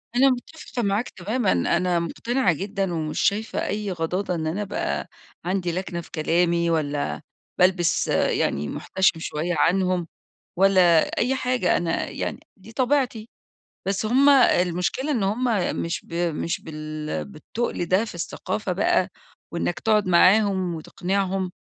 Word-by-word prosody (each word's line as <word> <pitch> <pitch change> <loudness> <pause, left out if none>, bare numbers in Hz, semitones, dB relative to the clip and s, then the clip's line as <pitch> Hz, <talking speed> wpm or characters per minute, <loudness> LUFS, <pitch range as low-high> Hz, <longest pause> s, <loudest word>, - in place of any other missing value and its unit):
أنا 270 +2 +6
مُتفقة 255 0 -4
معاك 205 +3 0
تمامًا، 210 +5 -1
أنا 170 - +1
مُقتنعة 210 +4 0
جدًا 195 +1 -2
ومش 155 -2 -2
شايفة 215 +3 0
أي 210 -1 -2
غضاضة 180 +2 -2
إن 160 -1 -2
أنا 185 +6 -2
أبقى 205 0 -2 0.4
عندي 180 -1 -1
لكنة 175 -1 -4
في - - -16
كلامي 170 +1 +1
والّا 150 -3 -1 0.4
بالبس 180 -2 +3
أ - - +2
يعني 70 +1 0
مُحتشم 190 - 0
شوية 165 +2 -2
عنهم، 180 0 +2 0.5
والّا 185 -3 +5 0.2
أي 255 +3 +2
حاجة، 250 -8 +1
أنا 170 -1 -1
يعني - - -4 0.2
دي 205 +4 -14
طبيعتي. 250 -4 0 0.6
بس 195 +2 0
هُم 265 +5 +4
المشكلة 210 - +3
إن 235 -8 +1
هُم 215 +6 0 0.4
مش 170 - -3
ب - - -17
مش 170 -1 -1
بال 155 - -5
بالتُّقل 175 - -4
ده 190 +6 +2
في 215 - -9
الثقافة 185 +3 -3
بقى 185 0 +2 0.4
وإنَّك 170 0 -2
تقعد 215 -3 +2
معاهم 185 0 +4
وتقنعهم، 185 +3 -2
185 Hz, 140 wpm, -24 LUFS, 170-215 Hz, 0.6 s, أنا